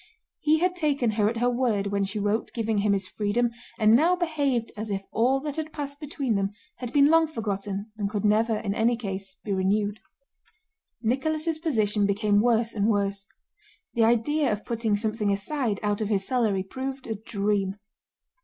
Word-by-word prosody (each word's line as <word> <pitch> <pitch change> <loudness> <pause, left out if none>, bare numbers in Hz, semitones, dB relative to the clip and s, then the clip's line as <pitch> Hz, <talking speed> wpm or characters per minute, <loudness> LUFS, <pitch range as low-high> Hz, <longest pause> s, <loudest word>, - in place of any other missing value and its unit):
He 305 +1 +3
had 360 +2 +1
taken 285 -8 +1
her 210 -1 +2
at 230 - -3
her 245 +2 +2
word 240 -5 +1
when 200 0 +1
she 195 +2 -3
wrote 205 +2 0
giving 225 -2 0
him 205 0 +2
his 195 -1 -1
freedom 220 +5 0 0.3
and 220 -1 +5
now 330 +8 +4
behaved 285 -9 0
as 215 +1 -5
if 195 -1 -2
all 255 +4 +2
that 295 0 -5
had 315 0 -3
passed 285 -1 -5
between 280 -5 -2
them 200 0 0 0.2
had 245 -2 -5
been 285 +2 +5
long 325 0 +5
forgotten 205 -5 -4
and 205 -2 -1
could 210 -1 -2
never 220 +1 +3
in 205 -2 -2
any 230 +3 +2
case 195 -4 -5
be 205 - -2
renewed. 205 +2 0 1.0
Nicholas' 310 +7 0
position 215 - +1
became 205 0 +2
worse 230 0 +2
and 205 -1 +1
worse. 200 -2 0 0.7
The 230 -1 +3
idea 240 +5 +2
of 210 0 -3
putting 225 -3 0
something 215 -1 -1
aside 215 +1 -1
out 205 0 0
of 215 - -1
his 195 -3 +1
salary 215 -7 +1
proved 265 +6 -5
a 225 - -2
dream. 200 -2 -1
220 Hz, 180 wpm, -26 LUFS, 205-265 Hz, 1.0 s, and